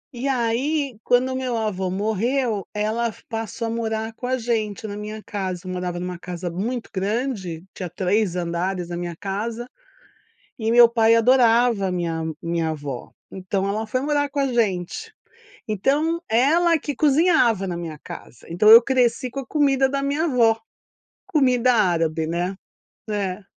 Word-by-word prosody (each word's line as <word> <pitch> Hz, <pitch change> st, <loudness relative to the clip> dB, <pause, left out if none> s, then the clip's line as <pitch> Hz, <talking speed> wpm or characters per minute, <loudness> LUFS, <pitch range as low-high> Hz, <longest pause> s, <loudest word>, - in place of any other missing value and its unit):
E 250 Hz, +3 st, -3 dB
aí 260 Hz, +1 st, 0 dB
quando 250 Hz, +1 st, +3 dB
o 260 Hz, -, -3 dB
meu 255 Hz, -3 st, -2 dB
avô 190 Hz, -4 st, -2 dB
morreu, 220 Hz, +3 st, -1 dB
ela 220 Hz, +2 st, -1 dB, 0.2 s
passou 225 Hz, 0 st, -4 dB
a -, -, -2 dB
morar 220 Hz, -1 st, -2 dB
com 245 Hz, -, -6 dB
a 255 Hz, +1 st, +1 dB
gente 225 Hz, -3 st, -2 dB
na 205 Hz, -, -6 dB
minha 210 Hz, +1 st, -7 dB
casa, 190 Hz, -4 st, -4 dB
eu 185 Hz, -, -5 dB
morava 180 Hz, -1 st, -3 dB
numa 180 Hz, -1 st, -5 dB
casa 175 Hz, 0 st, -5 dB
muito 225 Hz, +7 st, -4 dB
grande, 195 Hz, -4 st, -2 dB
tinha 180 Hz, -2 st, -6 dB
3 185 Hz, +2 st, 0 dB
andares 175 Hz, +1 st, -2 dB
na 175 Hz, -, -4 dB
minha 175 Hz, -1 st, -4 dB
casa, 220 Hz, +6 st, -4 dB, 0.9 s
e 225 Hz, -1 st, 0 dB
meu 240 Hz, 0 st, +8 dB
pai 230 Hz, -1 st, +4 dB
adorava 235 Hz, -3 st, +4 dB
a -, -, -2 dB
minha 170 Hz, -2 st, -2 dB, 0.2 s
minha 170 Hz, -1 st, -1 dB
avó, 145 Hz, -5 st, -6 dB, 0.2 s
então 190 Hz, +1 st, -2 dB
ela 215 Hz, +2 st, -2 dB
foi 255 Hz, +4 st, -1 dB
morar 290 Hz, 0 st, 0 dB
com 285 Hz, -, -2 dB
a 275 Hz, -, +2 dB
gente. 220 Hz, -, -1 dB, 0.6 s
Então 290 Hz, -, 0 dB
ela 325 Hz, +9 st, +4 dB
que 290 Hz, -1 st, -5 dB
cozinhava 280 Hz, -, +3 dB
na 180 Hz, -2 st, -3 dB
minha 165 Hz, -3 st, -6 dB
casa, 120 Hz, -4 st, -11 dB
então 175 Hz, +6 st, +3 dB
eu 225 Hz, +1 st, +12 dB
cresci 250 Hz, -1 st, +1 dB
com 275 Hz, -, -4 dB
a 265 Hz, -, -7 dB
comida 270 Hz, -2 st, +2 dB
da 275 Hz, 0 st, -2 dB
minha 285 Hz, +4 st, 0 dB
avó, 235 Hz, -7 st, +3 dB, 0.7 s
comida 255 Hz, -4 st, +3 dB
árabe, 165 Hz, -7 st, +1 dB
né? 175 Hz, +4 st, -2 dB, 0.5 s
É. 200 Hz, -2 st, -2 dB
220 Hz, 165 wpm, -23 LUFS, 185-255 Hz, 0.9 s, eu